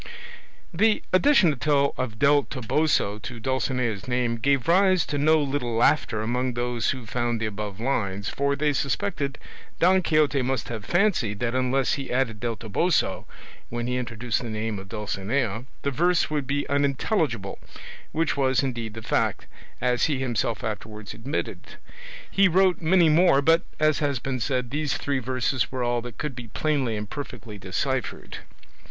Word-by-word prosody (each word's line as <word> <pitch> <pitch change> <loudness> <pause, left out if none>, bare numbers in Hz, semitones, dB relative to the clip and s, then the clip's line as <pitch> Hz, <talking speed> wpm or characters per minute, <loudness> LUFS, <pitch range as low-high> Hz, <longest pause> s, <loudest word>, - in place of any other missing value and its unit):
The 215 +5 +3
addition 185 - +5
of 140 -4 0
"Del 145 +3 +4
Toboso" 130 -4 0
to 120 +1 -7
Dulcinea's 125 -3 -1
name 125 -2 0
gave 135 +2 +1
rise 185 0 +4
to 145 - -2
no 155 +2 +4
little 135 -5 -1
laughter 115 -2 +2
among 125 +2 -1
those 120 -1 -1
who 130 -3 -3
found 120 +1 -1
the 110 - -1
above 105 -1 -5
lines, 100 -6 -1
for 140 0 0
they 145 +1 +1
suspected 140 0 -1 0.4
Don 185 +2 +5
Quixote 155 -4 +2
must 130 -1 -2
have 110 -3 -5
fancied 175 - +1
that 120 -1 0
unless 130 +1 +1
he 140 -2 -4
added 125 -4 0
"del 120 0 -2
Toboso" 110 - 0 0.4
when 120 0 -3
he 125 +1 -1
introduced 120 0 -2
the 120 - -5
name 110 -1 -3
of 95 0 -11
Dulcinea 110 +2 -2 0.2
the 140 - 0
verse 175 +4 +2
would 145 -4 -1
be 145 +2 -1
unintelligible; 140 - 0 0.5
which 165 0 0
was 135 -1 +2
indeed 115 -5 -3
the 115 - -8
fact, - - 0 0.3
as 125 -1 +2
he 150 -3 0
himself 120 -4 -1
afterwards 105 -1 -5
admitted. 130 +7 -5 0.6
He 195 0 +5
wrote 185 0 +3
many 170 +1 +4
more, 155 -2 +5
but, 165 +3 +5 0.2
as 155 -1 +3
has 145 -3 0
been 130 +1 -3
said, 125 0 -1
these 145 -1 -1
three 140 -2 -1
verses 130 0 -1
were 130 -1 -2
all 120 0 0
that 120 -2 -9
could 150 -4 -4
be 120 -1 -8
plainly 135 -4 -1
and 105 0 -5
perfectly 115 -6 -7
deciphered. 125 +6 -3
130 Hz, 160 wpm, -25 LUFS, 115-145 Hz, 0.6 s, addition